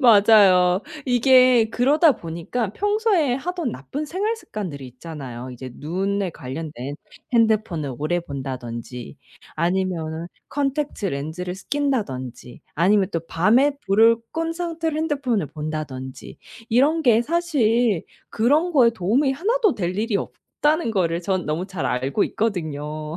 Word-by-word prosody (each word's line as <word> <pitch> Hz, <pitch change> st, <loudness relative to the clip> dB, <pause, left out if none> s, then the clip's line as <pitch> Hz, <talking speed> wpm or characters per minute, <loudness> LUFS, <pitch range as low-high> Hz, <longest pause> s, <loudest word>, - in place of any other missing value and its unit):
맞아요. 200 Hz, -6 st, +6 dB, 0.2 s
이게 250 Hz, -2 st, +5 dB
그러다 290 Hz, +6 st, +4 dB
보니까 175 Hz, +5 st, -4 dB
평소에 410 Hz, -, +1 dB
하던 335 Hz, -1 st, -3 dB
나쁜 275 Hz, -, -5 dB
생활 410 Hz, +8 st, -1 dB
습관들이 175 Hz, -, -6 dB
있잖아요, 130 Hz, -2 st, -8 dB
이제 125 Hz, +1 st, -8 dB
눈에 190 Hz, +4 st, -2 dB
관련된. 145 Hz, -1 st, -6 dB, 0.4 s
핸드폰을 215 Hz, -, +1 dB
오래 155 Hz, +4 st, 0 dB
본다든지 125 Hz, -4 st, -6 dB, 0.4 s
아니면은 170 Hz, -2 st, -1 dB, 0.2 s
콘택트렌즈를 185 Hz, -, -2 dB
쓰 190 Hz, -, -14 dB
낀다든지 140 Hz, -, -3 dB
아니면 190 Hz, +3 st, +3 dB
또 165 Hz, -, 0 dB
밤에 235 Hz, -, +3 dB
불을 225 Hz, +4 st, +5 dB, 0.2 s
끈 330 Hz, 0 st, -1 dB
상태로 330 Hz, -2 st, -3 dB
핸드폰을 280 Hz, -, 0 dB
본다든지 150 Hz, -4 st, -6 dB, 0.3 s
이런 290 Hz, +8 st, +3 dB
게 230 Hz, -4 st, +5 dB
사실 240 Hz, -, +1 dB, 0.3 s
그런 295 Hz, +10 st, +2 dB
거에 250 Hz, -6 st, +5 dB
도움이 235 Hz, +8 st, +1 dB
하나도 425 Hz, -, +1 dB
될 180 Hz, -1 st, -2 dB
일이 220 Hz, -1 st, +1 dB
없다는 300 Hz, +6 st, -1 dB
거를 170 Hz, -5 st, 0 dB
전 185 Hz, 0 st, -1 dB
너무 160 Hz, +5 st, -2 dB
잘 190 Hz, -4 st, -5 dB
알고 135 Hz, -, 0 dB
있거든요. 155 Hz, -6 st, -3 dB
200 Hz, 295 characters per minute, -22 LUFS, -, 0.4 s, 맞아요